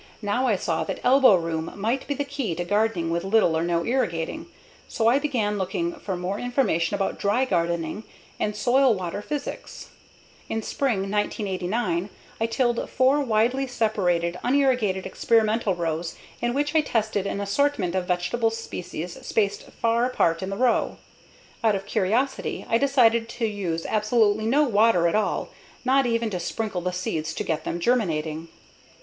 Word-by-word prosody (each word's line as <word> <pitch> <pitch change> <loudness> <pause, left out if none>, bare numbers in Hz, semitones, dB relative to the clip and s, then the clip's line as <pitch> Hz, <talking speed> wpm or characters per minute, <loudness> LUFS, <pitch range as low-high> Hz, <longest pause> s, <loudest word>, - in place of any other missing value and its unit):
Now 205 +6 +1
I 220 - +3
saw 165 -3 -1
that - - -4
elbow 260 -4 +6
room 165 -2 -2
might 230 +6 -1
be 285 - -1
the 285 - -1
key 275 - -3
to 175 - -3
gardening 205 -4 +1
with 170 0 -1
little 195 -4 +3
or 160 - +1
no 170 -1 0
irrigating, 250 - -1 0.4
so 225 - -2
I 250 +4 +5
began 220 -8 -1
looking 340 - -2
for 205 - -5
more 185 +3 -3
information 215 - 0
about 195 -1 -2
dry 210 +6 +2
gardening 170 0 -1 0.3
and 210 0 -1
soil/water 225 -7 +2
physics. 290 +5 -6 0.6
In 225 0 -2
spring 240 -7 0
1989, 195 -1 -1 0.3
I 225 - +1
tilled 240 +1 0
four 260 +3 +3
widely 245 +2 +1
separated, 180 -8 0
unirrigated 250 -8 +2
experimental 220 -3 +1
rows 165 -1 -3 0.3
in 240 +1 0
which 290 +2 0
I 315 - +5
tested 215 -7 -1
an 200 - -3
assortment 200 -2 0
of 185 -1 -1
vegetable 180 +6 +1
species 180 -6 -6
spaced 200 -2 -1
far 230 +1 +1
apart 165 -9 +1
in 190 - -3
the 195 - -4
row. 250 -1 +1 0.7
Out 220 -2 +4
of 195 0 -4
curiosity 230 +8 -1
I 230 - +2
decided 235 -4 +3
to 235 0 -2
use 185 -6 -3
absolutely 215 0 +2
no 285 +6 +4
water 215 - +4
at 170 - 0
all, 215 0 0 0.4
not 265 0 +3
even 230 -1 0
to 180 - -2
sprinkle 205 +1 -3
the 180 +1 -1
seeds 160 -3 -3
to - - -2
get 160 -2 -2
them 170 - -2
germinating. 165 -8 0
210 Hz, 160 wpm, -25 LUFS, 180-245 Hz, 0.7 s, elbow